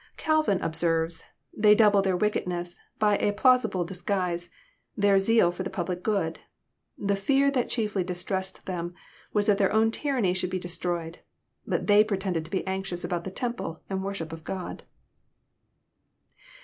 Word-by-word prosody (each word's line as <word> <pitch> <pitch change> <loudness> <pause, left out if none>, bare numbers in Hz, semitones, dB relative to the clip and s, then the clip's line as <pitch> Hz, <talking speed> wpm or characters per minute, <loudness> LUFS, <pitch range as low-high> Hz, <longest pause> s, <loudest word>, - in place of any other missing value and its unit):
Calvin 310 - +2
observes: 165 0 0
" - - -48
They 210 0 +6
double 205 -2 +5
their 190 -2 +1
wickedness 175 -4 -1 0.2
by 210 -1 +3
a 205 - +1
plausi 255 +4 +4
ble 180 -2 -1
disguise,— 180 -1 -2 0.5
their 200 -1 +4
zeal 210 -2 +4
for 175 - -6
the 185 - -3
public 180 -1 -3
good. 180 -6 -1 0.6
The 200 0 0
fear 275 +7 +2
that 255 -3 0
chiefly 210 -5 0
distressed 190 +1 -3
them 175 -1 -4 0.4
was 210 -1 +1
that 205 -2 +3
their 195 - +3
own 220 +1 +3
tyranny 245 -8 0
should 185 -1 -1
be 185 - -2
destroyed; 175 -1 -3 0.5
but - - -1
they 205 0 +6
pretend 195 -3 -2
to 165 - 0
be 190 - -2
anxious 190 -2 -3
about 175 -1 -2
the - - -3
temple 235 -6 -4
and 190 0 -1
worship 195 -5 -4
of 165 -1 -9
God." 185 +1 -5
190 Hz, 160 wpm, -27 LUFS, 175-210 Hz, 0.6 s, They